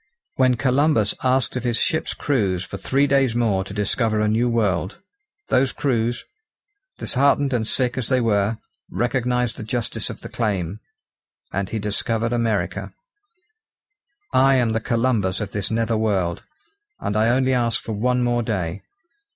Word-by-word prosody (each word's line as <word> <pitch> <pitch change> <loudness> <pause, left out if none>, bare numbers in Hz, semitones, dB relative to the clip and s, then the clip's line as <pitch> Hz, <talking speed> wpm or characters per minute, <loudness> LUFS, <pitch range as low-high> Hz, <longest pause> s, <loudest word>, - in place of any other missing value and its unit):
When 130 -1 +3
Columbus 130 -3 +2
asked 130 0 +1
of 125 - -2
his 120 -2 0
ships' 160 -3 0
crews 100 -11 0
for 100 - -7
three 135 +7 +1
days 135 -4 +2
more 110 -5 +1
to 95 - -10
discover 110 +2 0
a 105 - +2
new 115 +3 +2
world, 100 -5 0 0.5
those 130 0 +3
crews, 120 -3 -1 0.7
disheartened 140 +1 +2
and 110 -3 0
sick 125 +1 +1
as 120 - -4
they 130 -1 +3
were, 110 -2 +1 0.3
recognised 125 -1 0
the - - -6
justice 115 +1 -2
of - - -8
the - - -7
claim, 100 -4 -2 0.7
and 100 0 -2
he 115 - -3
discovered 110 +2 -1
America. 110 -6 -1 1.4
I 135 +1 +5
am 120 -3 +2
the 110 - 0
Columbus 115 -5 0
of 105 -3 -4
this 100 0 -2
nether 115 0 0
world, 95 -6 0 0.6
and 105 - -3
I 110 +2 +3
only 130 +2 +2
ask 120 -2 +1
for - - -7
one 125 +4 +1
more 120 0 +1
day. 95 -7 -3
115 Hz, 155 wpm, -22 LUFS, 105-125 Hz, 1.4 s, I